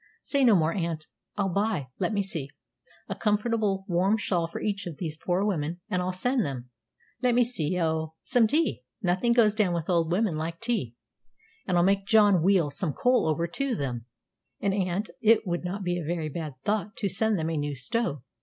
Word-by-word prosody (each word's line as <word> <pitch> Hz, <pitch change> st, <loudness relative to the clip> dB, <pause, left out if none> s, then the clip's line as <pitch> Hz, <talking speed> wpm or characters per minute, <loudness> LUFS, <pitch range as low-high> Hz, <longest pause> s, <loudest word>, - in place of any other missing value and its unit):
"Say 280 Hz, -1 st, +1 dB
no 235 Hz, -5 st, +6 dB
more, 165 Hz, -2 st, +2 dB
aunt. 165 Hz, -4 st, -3 dB, 0.3 s
I'll 195 Hz, -3 st, 0 dB
buy 200 Hz, -9 st, 0 dB
let -, -, 0 dB
me 205 Hz, -2 st, +1 dB
see 160 Hz, -8 st, -4 dB, 0.6 s
a -, -, -2 dB
comfortable 210 Hz, -2 st, 0 dB
warm 185 Hz, +4 st, +2 dB
shawl 175 Hz, -5 st, 0 dB
for 165 Hz, -, -6 dB
each 200 Hz, -2 st, -2 dB
of 160 Hz, -5 st, -7 dB
these 160 Hz, -4 st, -4 dB
poor 180 Hz, +4 st, 0 dB
women; 170 Hz, -4 st, -1 dB
and 180 Hz, -, +1 dB
I'll 180 Hz, +1 st, -1 dB
send 245 Hz, +6 st, 0 dB
them 125 Hz, -4 st, -5 dB, 0.5 s
let 250 Hz, -2 st, +3 dB
me 245 Hz, -, +5 dB
see 180 Hz, -8 st, -1 dB
O, 160 Hz, -1 st, -1 dB
some 235 Hz, -3 st, +3 dB
tea 310 Hz, +8 st, +1 dB, 0.2 s
nothing 185 Hz, +6 st, +2 dB
goes 230 Hz, -3 st, +5 dB
down 205 Hz, -5 st, +1 dB
with 170 Hz, +1 st, -2 dB
old 170 Hz, -1 st, +2 dB
women 190 Hz, -2 st, +1 dB
like 165 Hz, +2 st, -4 dB
tea; 220 Hz, -, -2 dB, 0.7 s
and 180 Hz, -2 st, +2 dB
I'll 175 Hz, -, +4 dB
make 195 Hz, +1 st, +2 dB
John 205 Hz, -4 st, +5 dB
wheel 175 Hz, -4 st, +3 dB
some 170 Hz, -2 st, -2 dB
coal 250 Hz, -, +2 dB
over 160 Hz, +2 st, +1 dB
to 265 Hz, +7 st, -1 dB
them; 125 Hz, -, -4 dB, 0.5 s
and, 200 Hz, -1 st, 0 dB
aunt, 195 Hz, +1 st, -1 dB
it 225 Hz, 0 st, +4 dB
would 175 Hz, -1 st, -2 dB
not 190 Hz, +3 st, -4 dB
be 175 Hz, -1 st, -1 dB
a -, -, -4 dB
very 160 Hz, 0 st, -2 dB
bad 155 Hz, -2 st, -5 dB
thought 210 Hz, 0 st, -1 dB
to 205 Hz, -, -1 dB
send 215 Hz, +2 st, +1 dB
them 160 Hz, 0 st, -1 dB
a -, -, -1 dB
new 145 Hz, -1 st, -2 dB
stove. 150 Hz, -, -1 dB
185 Hz, 205 wpm, -27 LUFS, 165-215 Hz, 0.7 s, no